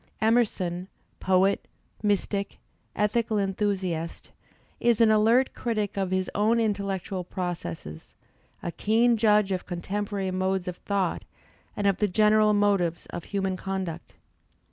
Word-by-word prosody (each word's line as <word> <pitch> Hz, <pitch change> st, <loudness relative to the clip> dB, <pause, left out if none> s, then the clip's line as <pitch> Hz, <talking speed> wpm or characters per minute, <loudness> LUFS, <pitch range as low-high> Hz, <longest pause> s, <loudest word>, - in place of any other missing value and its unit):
Emerson, 195 Hz, -6 st, +1 dB, 0.3 s
poet» 190 Hz, +1 st, +2 dB, 0.3 s
mystic, 200 Hz, -1 st, -1 dB, 0.4 s
ethical 215 Hz, +1 st, +1 dB
enthusiast, 190 Hz, -4 st, -2 dB, 0.5 s
is 235 Hz, -2 st, +3 dB
an 225 Hz, -2 st, +6 dB
alert 225 Hz, +5 st, +4 dB
critic 215 Hz, -4 st, -2 dB
of 195 Hz, -2 st, -1 dB
his 185 Hz, 0 st, 0 dB
own 220 Hz, +3 st, +2 dB
intellectual 200 Hz, -3 st, -2 dB
processes, 170 Hz, -, -6 dB, 0.5 s
a 170 Hz, -, -2 dB
keen 230 Hz, +7 st, +3 dB
judge 210 Hz, -2 st, +3 dB
of 185 Hz, -1 st, -2 dB
contem 195 Hz, +4 st, -3 dB
porary 195 Hz, -2 st, -2 dB
modes 185 Hz, 0 st, -1 dB
of 180 Hz, -1 st, -4 dB
thought 195 Hz, -4 st, -1 dB, 0.5 s
and 205 Hz, -, -1 dB
of 195 Hz, -2 st, +3 dB
the 210 Hz, -, +2 dB
general 215 Hz, +2 st, +4 dB
motives 200 Hz, -5 st, +1 dB
of 170 Hz, -, -6 dB
human 195 Hz, -2 st, -1 dB
conduct. 190 Hz, -3 st, -5 dB
200 Hz, 125 wpm, -26 LUFS, 185-210 Hz, 0.5 s, an